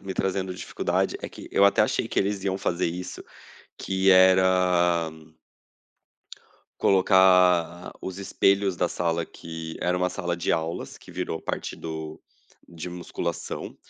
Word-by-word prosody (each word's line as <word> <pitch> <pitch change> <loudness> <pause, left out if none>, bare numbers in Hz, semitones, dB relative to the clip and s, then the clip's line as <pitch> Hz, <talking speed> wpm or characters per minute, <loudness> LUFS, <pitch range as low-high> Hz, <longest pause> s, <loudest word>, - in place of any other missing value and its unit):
me 95 -1 -6
trazendo 95 0 -1
dificuldade - - -1
é - - -5
que - - -11
eu 100 - +4
até 100 - +4
achei - - 0
que - - -2
eles 100 0 0
iam 95 -1 -1
fazer 90 -2 -1
isso, 90 +2 -6 0.6
que 95 0 +2
era 90 -2 +4 1.7
colocar 90 -3 +4
os 95 0 -6
espelhos 100 -1 +1
da 90 - +1
sala, 85 -1 -1
que 80 -1 -8
era 90 0 +1
uma 90 0 0
sala 90 -3 -3
de 85 - -2
aulas, 80 +1 -3
que - - -15
virou 80 - -3
parte - - -4
do 80 -1 -7 0.5
de 85 0 -7
musculação. 85 -1 -5
90 Hz, 140 wpm, -25 LUFS, 85-95 Hz, 1.7 s, eu